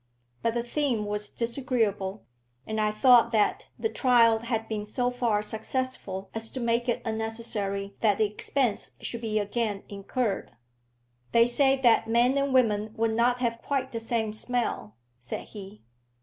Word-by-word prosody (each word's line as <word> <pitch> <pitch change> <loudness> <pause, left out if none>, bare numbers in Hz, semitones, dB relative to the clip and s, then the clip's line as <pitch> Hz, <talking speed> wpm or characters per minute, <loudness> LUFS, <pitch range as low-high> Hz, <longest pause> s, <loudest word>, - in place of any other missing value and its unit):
But 230 0 0
the 235 - 0
theme 240 -4 -1
was 210 0 -3
disagreeable, 230 -5 -1 0.4
and 220 0 -2
I 215 - +2
thought 235 +2 +5
that 215 -2 +1
the - - 0
trial 235 - +4
had 225 -1 -2
been 215 -2 -3
so 245 +4 -1
far 235 -4 0
successful 220 -3 -3
as 225 0 -4
to 260 - -6
make 235 +1 0
it 240 - -1
unnecessary 220 -3 -3
that 210 -3 +3
the 215 - +3
expense 210 +2 -1
should 235 - -5
be 220 -2 -1
again 205 0 -1
incurred. 200 +1 -3 0.8
"They 230 0 +6
say 270 +3 +4
that 230 -2 +4
men 240 +3 +3
and 280 0 +1
women 220 -4 +2
would 225 0 +1
not 245 +2 +2
have 230 -1 -1
quite 265 -2 -2
the 230 - -3
same 225 -1 -1
smell," 225 - -2 0.2
said 120 -1 -6
he. 205 0 -10
230 Hz, 160 wpm, -27 LUFS, 210-245 Hz, 0.8 s, They